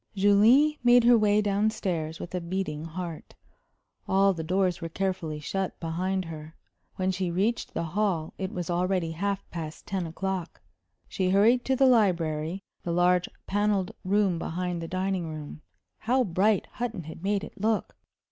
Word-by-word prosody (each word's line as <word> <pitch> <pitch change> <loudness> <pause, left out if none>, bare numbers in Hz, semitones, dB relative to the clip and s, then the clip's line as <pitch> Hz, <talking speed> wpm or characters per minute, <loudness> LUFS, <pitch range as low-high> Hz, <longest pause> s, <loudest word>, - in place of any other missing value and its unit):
Julie 225 +10 +5
made 245 0 +6
her 240 +1 +7
way 210 -1 +3
down 205 +1 +2
stairs 170 -7 -3
with 175 - -7
a 180 - -2
beating 170 -3 -3
heart. 165 0 -7 0.7
All 195 +1 +4
the 165 -2 -5
doors 185 +1 0
were 165 - -4
carefully 175 -4 -2
shut 190 +5 -3
behind 185 +3 -2
her. 160 0 -9 0.4
When 185 0 0
she 185 -1 -2
reached 200 +7 -1
the 165 - -1
hall 170 -2 -1
it 190 -1 -3
was 175 -1 -4
already 180 -1 0
half 200 +4 -2
past 160 -2 -6
ten 185 -3 -2
o'clock. 185 +1 -4 0.5
She 185 -1 -1
hurried 220 +6 +4
to 265 - +2
the 270 - +4
library, 180 -7 +2 0.2
the 170 - -3
large 175 +1 +3 0.2
panelled 205 -2 +1
room 195 -2 +2
behind 175 +1 -3
the 165 - -5
dining 185 -1 -2
room. 155 -1 -8 0.4
How 255 +3 +2
bright 200 +1 +2
Hutton 230 -7 -4
had 160 +1 -9
made 200 +1 0
it 205 - -10
look! 220 0 0
185 Hz, 165 wpm, -27 LUFS, 170-205 Hz, 0.7 s, her